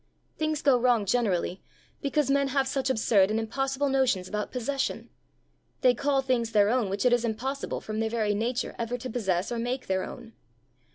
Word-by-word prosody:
Things 310 -1 -1
go 270 -4 +5
wrong, 240 -4 +3
generally, 195 -5 0 0.4
because 280 -1 +1
men 280 0 +3
have 270 0 +1
such 265 0 -1
absurd 210 -5 +3
and 215 +1 0
impossible 270 +5 -1
notions 255 -9 +1
about 210 +1 -3
possession. 265 +2 -2 0.7
They 250 -2 +5
call 275 +2 +1
things 235 -3 0
their 205 0 +4
own 240 -5 +1
which 200 +5 -2
it 250 - +5
is 240 -1 +2
impossible, 250 +5 -3
from 215 0 -4
their 225 0 0
very 220 -2 0
nature, 235 +4 -2
ever 235 +1 -2
to 255 0 -6
possess 195 -4 -1
or 235 - -2
make 250 +2 -2
their 190 0 0
own. 235 -2 -9
240 Hz, 185 wpm, -27 LUFS, 215-270 Hz, 0.7 s, go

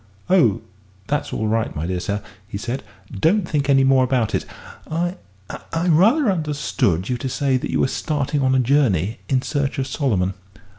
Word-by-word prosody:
"Oh, 130 - +4 0.4
that's 145 +5 -2
all 110 - -1
right, 110 +1 0
my 75 - -3
dear 90 +1 -2
sir," 100 +3 -3 0.2
he 100 - -5
said, 120 +5 -4 0.3
"don't 170 - +2
think 145 -3 -1
any 135 -1 +5
more 135 -1 +4
about 125 -4 0
it. - - 0 0.4
I 175 +3 -1 0.3
I 165 +2 -3
rather 215 - +4
understood 145 - 0
you 125 - -1
to 130 - -3
say 135 0 0
that - - -4
you - - 0
were - - +3
starting 145 0 -1
on 130 0 +2
a - - +4
journey 115 - +2
in 130 -1 +2
search 145 0 -1
of 135 - 0
Solomon?" 110 - 0
135 Hz, 185 wpm, -21 LUFS, 110-150 Hz, 0.4 s, any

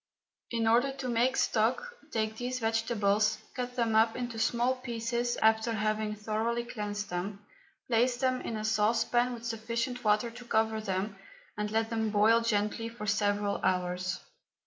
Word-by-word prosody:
In 230 -1 0
order 245 +5 +4
to 270 -1 -5
make 245 +3 +2
stock, 245 - +1 0.2
take 220 -1 -1
these 250 +1 -2
vegetables, 220 -2 +1 0.2
cut 250 -1 -4
them 230 -3 +1
up 225 +1 +4
into 240 -2 -4
small 240 +3 +1
pieces, 240 -1 -2
after 220 +1 +3
having 215 0 -1
thoroughly 220 +3 -1
cleansed 205 -4 -4
them, 195 +3 -4 0.4
place 245 +1 +2
them 255 0 +1
in 225 - -4
a 215 - -3
saucepan 225 +3 +2
with 235 0 -10
sufficient 230 +2 -3
water 215 +2 +2
to 240 +1 -11
cover 220 -1 +1
them, 195 0 -2 0.4
and 210 0 -2
let 225 +1 0
them 220 -1 0
boil 215 +2 +4
gently 225 0 0
for 230 -2 -7
several 205 -1 +1
hours. 180 0 0
225 Hz, 155 wpm, -30 LUFS, 210-235 Hz, 0.4 s, order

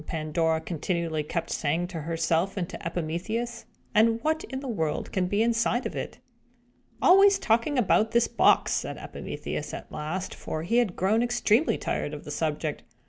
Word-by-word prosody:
Pandora 160 0 0
continually 165 -1 -2
kept 170 +3 -3
saying 160 +4 0
to 165 -3 -5
herself 165 +4 0
and 175 -3 -1
to - - -8
Epimetheus. 180 +8 -3 0.3
"And 225 +1 +4
what 315 +1 0
in 265 - -5
the 275 - -7
world 160 -10 -2
can 185 -2 0
be 205 +4 +2
inside 235 +2 +1
of - - -4
it?" - - -5 0.9
"Always 390 +2 +7
talking 230 +6 +1
about 220 -1 +3
this 235 +1 +3
box!" - - +3
said - - -2
Epimetheus, - - -5
at - - -10
last; 170 +5 -4
for 155 - -5
he 225 +8 +1
had 230 -7 +2
grown 210 +5 +2
extremely 245 +3 +2
tired 150 - -2
of 145 - -9
the 150 - -7
subject. 150 0 -2
185 Hz, 170 wpm, -27 LUFS, 160-235 Hz, 0.9 s, Always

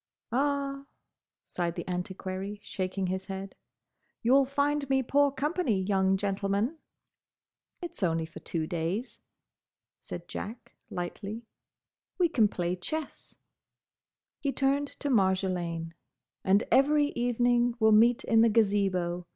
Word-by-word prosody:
"Ah," 275 +1 -1 0.6
sighed 170 -1 -2
the 175 - -5
Antiquary, 190 +2 -4
shaking 190 0 -3
his 190 +1 -2
head, 195 0 -6 0.7
"you'll 265 +4 +5
find 285 +1 0
me 265 -1 +3
poor 285 +3 +3
company, 290 - 0
young 190 0 +2
gentleman." 200 +8 -1 1.0
"It's 345 - -7
only 165 -3 +1
for 160 - -11
two 160 -2 -3
days," 175 +8 -3 0.8
said 175 0 -8
Jack 220 +6 -7 0.2
lightly. 200 +6 -5 0.7
"We 350 -2 +3
can 230 -9 +4
play 175 -2 -2
chess." 305 - -6 1.0
He 280 - -1
turned 275 +1 +1
to 290 - -1
Marjolaine. 185 -5 0 0.5
"And 195 +2 +4
every 290 +3 +4
evening 245 -1 +1
we'll 220 -1 +5
meet 230 +3 +5
in 225 -1 +4
the 230 - +6
Gazebo. 195 -5 +1
210 Hz, 120 wpm, -29 LUFS, 185-270 Hz, 1.0 s, the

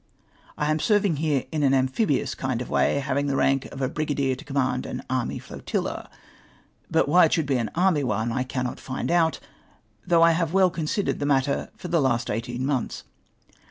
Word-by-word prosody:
" - - -32
I 150 +1 0
am 155 - +1
serving 205 -4 +2
here 150 -3 0
in 155 -2 -1
an 135 -1 +4
amphibious 130 - +1
kind 130 -3 -2
of 125 - -6
way - - +2
— - - -2
hav 140 0 -1
ing 145 - -1
the 140 - 0
rank 135 0 +2
of 135 -1 -4
brigadier 145 -3 0
to 130 - -8
command 135 -3 -1
an - - -4
^^ - - -6
army 130 -2 -1
flotilla! - - -4 0.4
"' - - -34
but 160 -2 +2
why 175 +4 +6
it 155 - 0
should 160 -4 +1
be 135 -2 +1
an 115 -3 -2
"army" 175 -4 +2
one 110 -1 -1
I 130 - -1
cannot 130 -1 -3
find 130 +4 -4
out, 165 -2 +2 0.7
though 170 -2 +5
I 165 - +6
have 165 0 0
well 190 -2 +4
considered 170 +5 -2
the 145 - -1
matter 140 0 +1
/or 175 - -7
the 170 -2 +3
last 125 -4 0
eighteen 120 +4 -3
mont/ts. 135 -4 -2
140 Hz, 215 wpm, -25 LUFS, 130-160 Hz, 0.7 s, why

